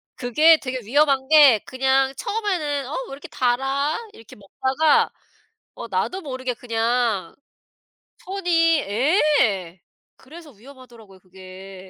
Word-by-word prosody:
그게 305 +6 +4
되게 255 -1 -5
위험한 270 +3 +1
게 285 -7 +6
그냥 265 +1 0
처음에는 345 - -3
'어 290 - -7 0.2
왜 - - -11
이렇게 275 +1 -10
달아?' 270 +4 -1 0.2
이렇게 225 - -15
먹다가 265 +9 0 0.7
어 - - -8
나도 380 +1 -3
모르게 260 -3 -5
그냥 230 -5 -2 0.9
손이 345 -4 +1
예 220 - 0 0.4
그래서 310 +2 -14
위험하더라고요 235 -4 -17
그게. 185 0 -13
265 Hz, 250 characters per minute, -22 LUFS, 225-300 Hz, 0.9 s, 게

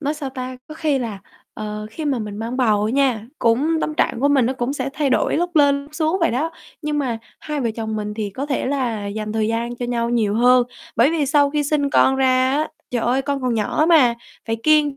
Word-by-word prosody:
nói 295 +1 -1
sao 290 -3 -5
ta, 255 0 -6
có 310 - -8
khi 305 -4 0
là, 225 -5 -4 0.4
ờ, 210 0 -5
khi 310 +8 -6
mà 280 -4 0
mình 210 -2 -5
mang 230 +3 -4
bầu 215 -5 +2
á 215 - 0
nha, 255 -5 +1
cũng 290 +8 +2
tâm 305 - -2
trạng 240 - 0
của 285 - +3
mình 275 -4 +3
nó 255 - +1
cũng 250 0 -2
sẽ 275 -2 -3
thay 290 -2 0
đổi - - +2
lúc 350 +1 -1
lên, 280 -1 +4
lúc 290 +2 -16
xuống 320 +3 0
vậy 335 - +3
đó. 290 +7 -1 0.3
Nhưng 300 -1 -1
mà 245 -5 -1 0.2
hai 300 -1 -3
vợ 235 -3 0
chồng 220 -1 -3
mình 210 0 -4
thì 210 -2 -3
có 265 +8 -4
thể 275 -3 -1
là 245 -7 -1
dành 210 +1 -4
thời 220 -1 0
gian 235 +1 -2
cho 245 - -4
nhau 235 -1 -1
nhiều 215 -4 +1
hơn, 245 +1 +5 0.3
bởi 245 +7 +5
vì 310 -4 0
sau 285 0 +3
khi 295 0 0
sinh 285 -1 0
con 265 - +4
ra 260 -1 +3
á, 305 +2 0 0.2
trời 240 -2 -1
ơi, 255 +3 +1
con 280 0 -2
còn 250 -2 0
nhỏ 225 +8 +1
mà, 275 -9 +5 0.3
phải 225 0 -1
kiêng, 300 -1 +3
260 Hz, 255 wpm, -21 LUFS, 230-290 Hz, 0.4 s, hơn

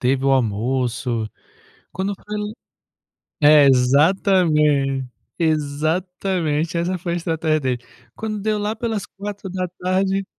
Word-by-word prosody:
teve 130 +2 +1
o 135 - +3
almoço. 120 0 0 0.6
Quando 190 +2 -2
foi 210 +2 -8 1.1
É 150 -1 +7
exatamente, 145 0 +3 0.3
exatamente 160 +2 -1
essa 175 +2 -1
foi 175 0 -3
estratégia 160 -2 0
dele. 130 -3 -1 0.4
Quando 215 -1 -4
deu 215 +1 0
lá 210 +1 -2
pelas 220 -3 -3
16h, 190 -1 -2
160 Hz, 100 wpm, -21 LUFS, 135-190 Hz, 1.1 s, É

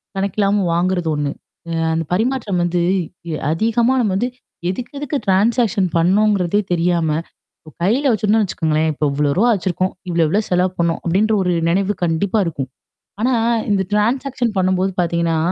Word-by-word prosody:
கணக்கில்லாம 200 0 +1
வாங்குறது 175 -1 0
ஒண்ணு. 145 -1 -1 0.4
அ - - -4 0.2
அந்த 165 0 0
பரிமாற்றம் 220 -2 0
வந்து 175 0 0 0.5
இ - - -2 0.2
அதிகமா 230 +8 +2
நம்ம 210 -5 0
வந்து 240 +6 0 0.4
எதுக்கெதுக்கு 280 +8 -4
ட்ரான்சாக்ஷன் 210 +1 +2
பண்ணோங்கிறதே 195 +2 +2
தெரியாம, 170 -1 +1 0.6
இ - - -8
கையில 235 +10 +2
வச்சுருந்தோன்னு 215 0 +2
வச்சக்கோங்களேன், 160 -2 0
இப்ப 150 - -5
இவ்ளோ 145 0 +1
ரூவா 235 +5 +4
வச்சுருக்கோம். 185 -1 -1 0.2
இவ்வளோ 170 -1 +2
இவ்வளோ 200 +8 +1
செலவு 180 0 +2
பண்ணோம் 170 -1 +1
அப்டின்ற 200 +6 +2
ஒரு 180 - 0 0.2
நெனைவு 195 +3 +1
கண்டிப்பா 175 +5 0
இருக்கும். 140 -6 -4 0.5
ஆனா 250 +4 +2 0.4
இந்த 200 -2 +2
ட்ரான்சாக்ஷன் 240 +3 0
பண்ணும்போது 185 +1 +1
பார்த்தீங்கன்னா, 170 -1 0
190 Hz, 145 wpm, -19 LUFS, 170-215 Hz, 0.6 s, ரூவா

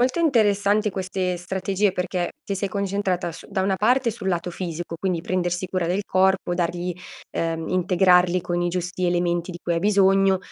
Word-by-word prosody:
Molto 255 +5 +2
interessanti 210 -8 +3
queste 185 -1 -2
strategie 190 +2 -1
perché 180 -1 -2
ti 200 - -3
sei 200 +1 -2
concentrata 195 -3 -1
su 165 - -11
da 195 -2 -1
una 190 0 +1
parte 240 +4 +2
sul 205 -3 -8
lato 175 -1 -1
fisico, 170 -1 -5
quindi 185 -3 -1
prendersi 175 +1 -1
cura 180 -2 -1
del 185 +4 0
corpo, 190 -1 +2
dargli 175 +1 -1 0.4
uhm, 165 -1 -2
integrarli 180 0 +3
con 175 0 -2
i 175 - +1
giusti 180 +1 -3
elementi 175 0 0
di 175 - -8
cui 170 - 0
hai - - +1
bisogno, 195 -1 +4
185 Hz, 175 wpm, -23 LUFS, 175-195 Hz, 0.4 s, bisogno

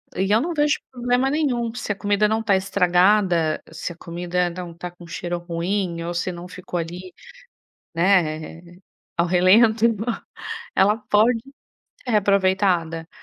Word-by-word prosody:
E 190 +2 0
eu 220 - +4
não 340 +5 -2
vejo 295 -2 +2
problema 245 +1 +1
nenhum. 250 -6 0
Se 240 -3 -4
a - - -1
comida 205 +1 +1
não 220 +1 0
tá 205 -3 +3
estragada, 180 -3 +2
se 165 +2 -5
a - - -20
comida 175 +1 -2
não 175 -1 -7
tá 175 +1 -7
com 175 -1 -14
cheiro 175 +1 -4
ruim 175 0 -2
ou 170 +1 -4
se 180 +2 -2
não 175 0 -8
ficou 180 0 -6
ali, 175 +2 -7 0.8
né, 165 -3 +1 0.6
ao 170 0 +2
relento, 210 +6 +4
então, 225 -1 +1 0.7
ela 205 +3 +4
pode 225 +3 +4 0.6
ser 245 - -4
reaproveitada. 190 -5 +1
185 Hz, 150 wpm, -22 LUFS, 175-215 Hz, 0.8 s, eu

